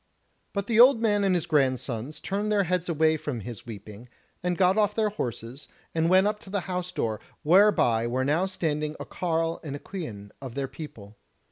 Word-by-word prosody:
But 200 -1 -2
the 225 +1 +1
old 250 0 +8
man 205 -3 +2
and 190 -2 +3
his 175 -2 0
grandsons 130 -3 0
turned 205 +2 -2
their 205 -1 +3
heads 180 0 -1
away 160 -1 +3
from 145 -6 -4
his 115 +1 -8
weeping, 110 +1 -10 0.3
and 180 -1 -1
got 185 0 +4
off 210 -1 +2
their 220 -1 +2
horses, 125 - -5 0.3
and 165 0 +1
went 185 +2 +5
up 210 0 0
to 195 - -14
the 200 0 -1
house 180 +1 -4
door, 110 -2 -2 0.2
whereby 155 - +4
were 130 +2 0
now 160 +7 +2
standing 155 -5 -2
a - - -5
carle 165 -1 -1
and 145 -3 -5
a - - -6
quean 110 - -7
of 130 -4 -7
their 140 -1 -2
people. 110 -8 -10
160 Hz, 200 wpm, -27 LUFS, 130-190 Hz, 0.3 s, old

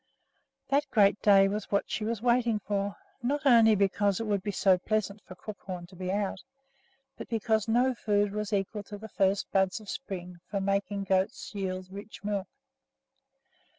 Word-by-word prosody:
That 285 +1 +2
great 205 -5 +4
day 195 -2 +6
was 205 +1 -3
what 200 - 0
she 215 - -2
was 225 0 -2
waiting 240 -2 +3
for, 200 0 -2 0.3
not 285 +4 -1
only 230 -4 +7
because 200 0 +1
it 225 - -2
would 205 -2 0
be 205 - -4
so 190 -2 +3
pleasant 215 +1 -1
for 185 - -12
Crookhorn 185 -2 -7
to 185 - -15
be 185 +1 -3
out, 200 -1 -2 0.8
but - - -7
because 220 -2 +1
no 245 +3 +3
food 205 -3 +1
was 210 0 -3
equal 205 +1 -1
to 205 - -8
the 220 +2 -9
first 195 0 +1
buds 190 +1 +2
of 215 - -14
spring 180 -8 -6
for 200 - -1
making 200 0 -1
goats 190 +2 0
yield 185 -2 -3
rich 200 +2 -10
milk. 200 -1 -2
205 Hz, 175 wpm, -29 LUFS, 195-220 Hz, 0.8 s, only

